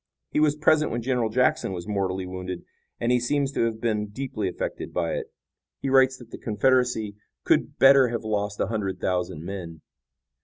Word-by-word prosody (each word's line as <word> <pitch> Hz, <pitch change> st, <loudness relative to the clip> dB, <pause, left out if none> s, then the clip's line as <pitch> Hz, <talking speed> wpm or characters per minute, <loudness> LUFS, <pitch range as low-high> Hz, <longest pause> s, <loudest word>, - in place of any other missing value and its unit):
He -, -, +1 dB
was 150 Hz, -1 st, +3 dB
present 155 Hz, 0 st, +3 dB
when 120 Hz, 0 st, -3 dB
General 125 Hz, -3 st, 0 dB
Jackson 125 Hz, -4 st, +1 dB
was 90 Hz, +1 st, -6 dB
mortally 95 Hz, -2 st, -1 dB
wounded, 90 Hz, -1 st, -6 dB, 0.3 s
and 120 Hz, -, +1 dB
he 125 Hz, -, +4 dB
seems 140 Hz, +3 st, 0 dB
to 115 Hz, -, +1 dB
have 110 Hz, -1 st, -2 dB
been 110 Hz, -2 st, 0 dB
deeply 110 Hz, -3 st, -3 dB
affected 90 Hz, -, -5 dB
by 85 Hz, -2 st, 0 dB
it. -, -, -4 dB, 0.5 s
He 135 Hz, -, -2 dB
writes 130 Hz, -1 st, +5 dB
that 120 Hz, -3 st, -14 dB
the -, -, -8 dB
Confederacy 110 Hz, -2 st, +1 dB, 0.3 s
could -, -, +1 dB
better 135 Hz, -1 st, +7 dB
have 115 Hz, -1 st, -3 dB
lost 105 Hz, -1 st, -2 dB
a -, -, +2 dB
hundred 95 Hz, -3 st, -3 dB
thousand 90 Hz, -4 st, -2 dB
men." 85 Hz, -4 st, -7 dB
110 Hz, 185 wpm, -25 LUFS, 95-130 Hz, 0.5 s, better